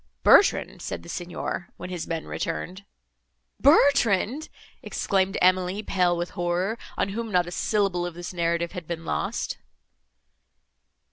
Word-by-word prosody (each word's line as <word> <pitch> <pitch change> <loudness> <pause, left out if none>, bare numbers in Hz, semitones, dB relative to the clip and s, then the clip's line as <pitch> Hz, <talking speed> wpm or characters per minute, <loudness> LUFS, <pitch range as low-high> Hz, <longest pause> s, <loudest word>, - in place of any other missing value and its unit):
'Bertrand,' - - +5
said 85 - -5
the 85 - -11
Signor, 175 0 -4
when 180 +1 -7
his 175 -3 -4
men 165 -1 -3
returned—" 180 +4 -4 0.7
"Bertrand!" 275 - +4 0.3
exclaimed 190 -1 0
Emily, 185 +2 +2
pale 180 -3 +1
with 175 +1 -3
horror, 175 +6 -1 0.2
on - - 0
whom 225 +2 -4
not 180 -2 +3
a 175 - -7
syllable 195 -2 0
of 175 - -8
this 175 +1 -6
narrative 170 0 0
had 180 -4 -7
been 165 -1 -5
lost. - - -2
180 Hz, 135 wpm, -25 LUFS, 175-200 Hz, 0.7 s, Bertrand